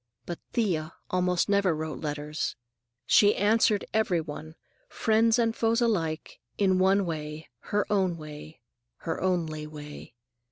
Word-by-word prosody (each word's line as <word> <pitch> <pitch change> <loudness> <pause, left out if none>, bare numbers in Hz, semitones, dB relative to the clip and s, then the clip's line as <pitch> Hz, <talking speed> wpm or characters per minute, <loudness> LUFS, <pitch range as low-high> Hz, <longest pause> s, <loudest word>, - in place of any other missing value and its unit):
But 175 - -5
Thea 165 -9 0 0.2
almost 180 -1 +1
never 200 -4 +3
wrote 155 0 -4
letters. 150 0 -3 0.5
She 205 0 +5
answered 210 0 +3
every 215 -6 +2
one, 155 0 -7 0.3
friends 225 +1 +3
and 230 -1 +1
foes 230 +1 +2
alike, 170 -10 -1 0.2
in 190 -2 +3
one 190 +1 +4
way, 155 -1 -5 0.2
her 205 0 +1
own 185 -4 +1
way, 155 -2 -10 0.4
her 165 - -2
only 160 -5 -1
way. 150 -4 -10
180 Hz, 130 wpm, -28 LUFS, 155-205 Hz, 0.5 s, She